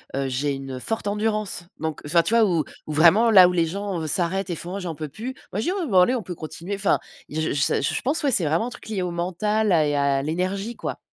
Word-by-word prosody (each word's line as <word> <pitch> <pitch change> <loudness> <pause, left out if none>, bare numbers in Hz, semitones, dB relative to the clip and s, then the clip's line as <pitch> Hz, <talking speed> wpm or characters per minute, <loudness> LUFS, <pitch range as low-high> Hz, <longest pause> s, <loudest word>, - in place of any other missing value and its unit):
heu, 135 0 -1
j'ai 140 +2 -1
une 135 -1 -6
forte 225 - -3
endurance. 210 -3 -1
Donc 160 -2 -4
enfin, 170 +3 +3
tu - - -1
vois 230 -1 +5
où 170 -6 +1 0.2
où - - -4
vraiment, 175 +10 +5
là 185 -5 +8
où - - 0
les 170 -2 +1
gens, 195 0 -3
heu, 160 - -3
s'arrêtent 185 +4 -1
et 175 - -2
font: 175 +4 -6
«Oh - - -3
j'en 175 -4 -5
peux 155 0 -5
plus!» 240 - -6 0.2
moi 195 - -1
je 220 - -2
dis: - - +1
«Oui, 375 -3 -2
bon, 250 - -6
bah, 185 -2 +6
allez 245 +8 +3
on 230 - -3
peut 180 - -6
continuer», 165 +6 -6
enfin 200 0 +2 0.3
j 155 +1 -1
je 140 -1 +1
je - - -1
pense, 295 +4 -1
ouais, 280 - +2
c'est 180 - +3
vraiment 165 +10 +1
un - - -4
truc 240 - -11
lié 200 -4 -2
au 180 - -2
mental, 195 +5 0
à 160 -4 +4
et 145 - 0
à 140 -1 +2
l'énergie, 185 +8 -2
quoi. - - -5
180 Hz, 280 wpm, -24 LUFS, 155-210 Hz, 0.3 s, là